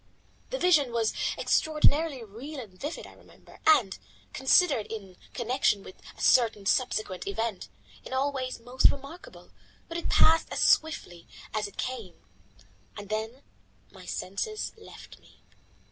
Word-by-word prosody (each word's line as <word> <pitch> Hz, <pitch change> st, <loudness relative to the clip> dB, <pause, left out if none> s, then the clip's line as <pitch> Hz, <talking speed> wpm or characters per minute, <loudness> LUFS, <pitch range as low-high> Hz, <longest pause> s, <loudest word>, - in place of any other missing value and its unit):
The -, -, -2 dB
vision 310 Hz, -, +4 dB
was 230 Hz, -2 st, +1 dB, 0.2 s
extraordinarily 305 Hz, -3 st, +2 dB
real 250 Hz, +8 st, -8 dB
and 215 Hz, -7 st, -9 dB
vivid, 295 Hz, -, -6 dB
I -, -, -13 dB
remember, -, -, -18 dB
and, 235 Hz, -, +4 dB, 0.3 s
considered 265 Hz, -, +3 dB
in 195 Hz, -5 st, -8 dB, 0.2 s
connection 240 Hz, -4 st, +1 dB
with 185 Hz, -, -13 dB, 0.2 s
a -, -, -10 dB
certain 225 Hz, -5 st, +4 dB
subsequent 210 Hz, -5 st, 0 dB
event, 205 Hz, -, -3 dB, 0.3 s
in -, -, -10 dB
all 270 Hz, +2 st, +1 dB
ways 255 Hz, -3 st, -4 dB
most 245 Hz, +3 st, +3 dB
remarkable, 280 Hz, +5 st, -9 dB, 0.4 s
but 335 Hz, 0 st, -4 dB
it -, -, -4 dB
passed 325 Hz, +1 st, +5 dB
as -, -, -2 dB
swiftly 180 Hz, -, +2 dB, 0.3 s
as 215 Hz, -1 st, -1 dB
it 200 Hz, -, -15 dB
came. 235 Hz, -8 st, -4 dB, 0.8 s
Then 220 Hz, +6 st, -4 dB, 0.5 s
my -, -, -14 dB
senses 315 Hz, -, -3 dB
left 445 Hz, -, -13 dB
me. -, -, -23 dB
250 Hz, 135 wpm, -28 LUFS, 210-295 Hz, 0.8 s, passed